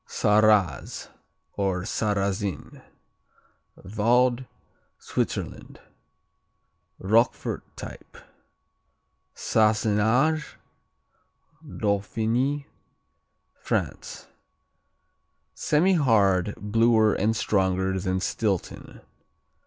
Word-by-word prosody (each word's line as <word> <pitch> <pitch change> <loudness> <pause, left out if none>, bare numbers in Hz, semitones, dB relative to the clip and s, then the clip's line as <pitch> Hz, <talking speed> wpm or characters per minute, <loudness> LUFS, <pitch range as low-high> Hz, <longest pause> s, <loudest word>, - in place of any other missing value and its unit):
Sarraz 105 -3 +2 0.4
or 95 -3 -1
Sarrazin 100 -1 -2 1.0
Vaud, 120 +5 +1 0.5
Switzerland - - -4 1.2
Roquefort 115 +5 +1 0.2
type. - - -10 1.2
Sassenage 110 +8 +1 1.1
Dauphiny, 115 +7 -1 0.9
France - - -4 1.3
Semihard; 115 - +2
bluer 110 +1 +2
and 110 +3 0
stronger 95 -2 0
than 95 0 -1
Stilton. 100 -1 -3
110 Hz, 50 wpm, -25 LUFS, 100-115 Hz, 1.3 s, Sarraz